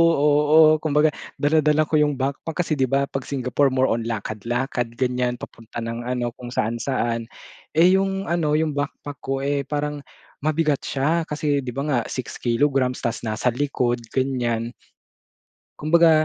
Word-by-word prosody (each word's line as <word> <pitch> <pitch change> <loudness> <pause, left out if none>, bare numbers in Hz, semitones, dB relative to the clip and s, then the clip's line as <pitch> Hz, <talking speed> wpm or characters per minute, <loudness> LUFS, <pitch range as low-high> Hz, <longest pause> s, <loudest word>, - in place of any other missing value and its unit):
oo. 150 +2 +5
Kumbaga 150 0 +2 0.2
dala-dala 150 +1 +3
ko 155 0 +1
yung 150 -1 +2
backpack 140 +6 -2
kasi, 155 -3 -2
'di 130 - +3
ba, 135 +2 +2
'pag 135 -2 -4
Singapore 135 0 +1
more 130 0 +3
on 115 0 -1
lakad-lakad, 120 +3 -2
ganyan, 125 -1 0
papunta 115 -1 -8
ng 115 0 -4
ano 125 -1 -1
kung 120 +1 -10
saan-saan. 115 0 -1 0.5
Eh, 170 +3 +6
yung 195 0 -1
ano 165 -4 0
yung 155 0 +1
backpack 145 -1 -5
ko, 135 +1 -3
eh, 140 -1 -1
parang 150 0 -2 0.4
mabigat 155 -1 +1
siya 155 +5 0
kasi, 150 -1 0
'di 130 -2 -4
ba, 140 - -1
nga 130 -5 +2
6 130 - -5
kilograms 130 +1 +1
tapos 115 0 -2
nasa 110 +3 0
likod, 125 -2 0
ganyan. 120 -3 -1 1.1
Kumbaga 160 0 +4
140 Hz, 150 wpm, -23 LUFS, 125-150 Hz, 1.1 s, Eh